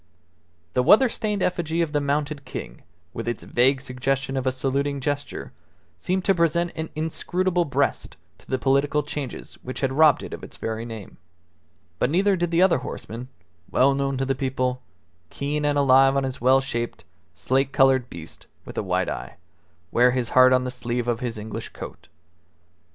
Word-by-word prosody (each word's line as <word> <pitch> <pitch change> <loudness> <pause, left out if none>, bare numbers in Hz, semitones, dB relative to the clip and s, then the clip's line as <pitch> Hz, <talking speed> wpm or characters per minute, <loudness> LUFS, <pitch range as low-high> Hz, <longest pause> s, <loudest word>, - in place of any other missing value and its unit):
The 125 - +3
weather 220 - +6
stained 210 -3 -2
effigy 170 -2 -1
of 160 - -3
the 145 -1 +1
mounted 145 0 -1
king, 60 - -7 0.3
with 115 - -5
its 120 -2 -3
vague 130 +2 +2
suggestion 135 +1 -2
of 130 0 -1
a - - +3
saluting 140 +2 -1
gesture, 145 +1 -3 0.4
seemed 180 - -2
to 195 - +5
present 170 0 +1
an 160 0 -4
inscrutable 175 +3 0
breast 140 - -1 0.2
to - - -22
the 130 - +1
political 140 +3 +2
changes 145 -2 -6
which 130 - -6
had 135 -1 +1
robbed 155 0 +5
it - - -7
of - - -8
its - - -10
very 115 +1 -4
name; 110 -4 -9 0.8
but - - +2
neither 195 +5 +3
did 175 -1 -1
the 170 +2 +4
other 190 -2 +4
horseman, 115 +3 -7 0.4
well 135 +2 +4
known 135 0 -1
to 135 - 0
the 135 - +1
people, 130 -1 -1 0.5
keen 150 +1 -2
and 145 0 +2
alive 135 0 +5
on 135 - +1
his 135 0 -4
well 130 +2 +5
shaped, 120 -3 -4 0.3
slate 130 - 0
coloured 135 -3 +3
beast 85 -1 -10 0.2
with - - -5
a - - +1
white - - 0
eye, - - -5 0.6
wear 125 +1 +5
his 125 -2 -1
heart 130 0 +6
on 130 0 +4
the 125 - -3
sleeve 120 -1 -3
of 120 -1 0
his 120 -3 -4
English 110 +1 -6
coat. - - -9
135 Hz, 180 wpm, -24 LUFS, 125-150 Hz, 0.8 s, weather